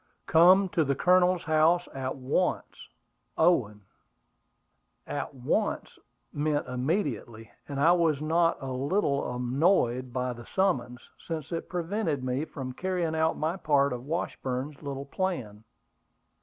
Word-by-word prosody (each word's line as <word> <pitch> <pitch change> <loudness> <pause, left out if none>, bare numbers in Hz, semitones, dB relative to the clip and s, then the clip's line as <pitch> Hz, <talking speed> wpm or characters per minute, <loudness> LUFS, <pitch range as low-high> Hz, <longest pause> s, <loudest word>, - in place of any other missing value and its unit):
"Come 185 +4 +6
to 175 -5 +1
the 140 -1 0
Colonel's 180 +3 +3
house 160 +3 +3
at 130 -1 -3
once. 135 +8 -2 0.5
OWEN." 120 -12 +2 1.2
"At 145 - -4
once" 125 -1 -2 0.3
meant 145 0 0
immediately; 125 - -3 0.2
and 140 -1 -4
I 160 +4 +5
was 165 -5 +2
not 165 +2 +2
a 135 - -4
little 140 -1 0
annoyed 125 -1 +1
by 125 0 -2
the 120 0 -12
summons, 125 -11 0 0.2
since 160 -2 -5
it 165 - -4
prevented 175 -5 -2
me 130 +4 -1
from 130 -5 -7
carrying 180 0 -2
out 160 0 +1
my 160 +4 -1
part 140 -6 +2
of 125 +2 -7
Washburn's 140 -4 -3
little 140 -2 -5
plan. 135 - -3
145 Hz, 130 wpm, -28 LUFS, 130-170 Hz, 1.2 s, Come